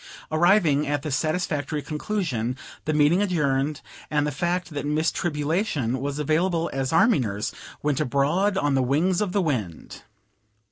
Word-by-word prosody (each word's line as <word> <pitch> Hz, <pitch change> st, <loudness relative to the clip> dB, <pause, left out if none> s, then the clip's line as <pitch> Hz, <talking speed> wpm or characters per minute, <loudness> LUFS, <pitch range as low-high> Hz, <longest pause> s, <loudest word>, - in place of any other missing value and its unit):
Arriving 160 Hz, -3 st, +3 dB
at 145 Hz, -1 st, -1 dB
this 150 Hz, -4 st, -1 dB
satisfactory 155 Hz, -2 st, -1 dB
conclusion, 150 Hz, -, -2 dB, 0.3 s
the 155 Hz, -, 0 dB
meeting 150 Hz, +5 st, +4 dB
adjourned, 150 Hz, -6 st, 0 dB, 0.3 s
and 150 Hz, -1 st, +1 dB
the 150 Hz, -, -1 dB
fact 175 Hz, +5 st, -2 dB
that 145 Hz, -2 st, -4 dB
Miss 150 Hz, +2 st, +1 dB
Tribulation 150 Hz, -, -1 dB
was 140 Hz, +1 st, -3 dB
available 165 Hz, +3 st, 0 dB
as 135 Hz, -1 st, -1 dB
army 210 Hz, +4 st, +4 dB
nurse 105 Hz, -4 st, -2 dB, 0.3 s
went 145 Hz, -2 st, +1 dB
abroad 155 Hz, +8 st, +1 dB
on 145 Hz, -3 st, +1 dB
the 135 Hz, -, +3 dB
wings 160 Hz, +9 st, +1 dB
of 205 Hz, -3 st, 0 dB
the 195 Hz, 0 st, +1 dB
wind. 110 Hz, -, -3 dB
150 Hz, 150 wpm, -25 LUFS, 140-175 Hz, 0.3 s, meeting